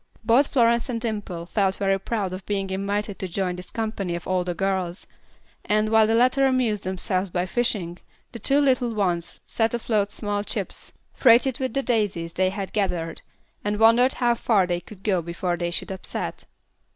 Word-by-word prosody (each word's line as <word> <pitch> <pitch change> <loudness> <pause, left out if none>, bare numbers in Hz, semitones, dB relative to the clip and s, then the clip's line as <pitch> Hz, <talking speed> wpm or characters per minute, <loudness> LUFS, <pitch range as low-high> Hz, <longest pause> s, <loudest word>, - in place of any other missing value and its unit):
Both 245 +5 +4
Florence 235 -1 +2
and 235 -2 -1
Dimple 205 -7 -4
felt 195 +1 +1
very 195 -1 +1
proud 195 -2 -2
of 185 +1 -6
being 195 -2 -1
invited 200 +1 -2
to 190 - -3
join 180 0 -2
this 180 0 -8
company 215 -6 -3
of 170 - -7
older 180 -1 0
girls; 190 -1 -2 0.6
and, 215 +1 +1
while 220 -1 +5
the 225 - +2
latter 255 +3 +4
amused 245 -7 +1
themselves 185 0 -1
by 175 +1 -1
fishing, 190 -6 -1 0.3
the 235 - -8
two 275 +7 +2
little 255 -5 +2
ones 175 -5 -1
set 225 +1 0
afloat 215 -3 0
small 205 -1 -2
chips, - - -4 0.2
freighted 245 0 +4
with 260 0 -2
the 275 - +1
daisies 205 -9 0
they 185 0 +2
had 195 0 -5
gathered, 175 -5 -1 0.4
and 205 0 -1
wondered 235 +4 +5
how 240 -2 +2
far 220 -4 +2
they 175 -1 -1
could 195 -1 -14
go 190 -5 +1
before 175 +1 -2
they 175 0 -2
should 175 - -2
upset. 190 - -5
205 Hz, 180 wpm, -24 LUFS, 185-230 Hz, 0.6 s, while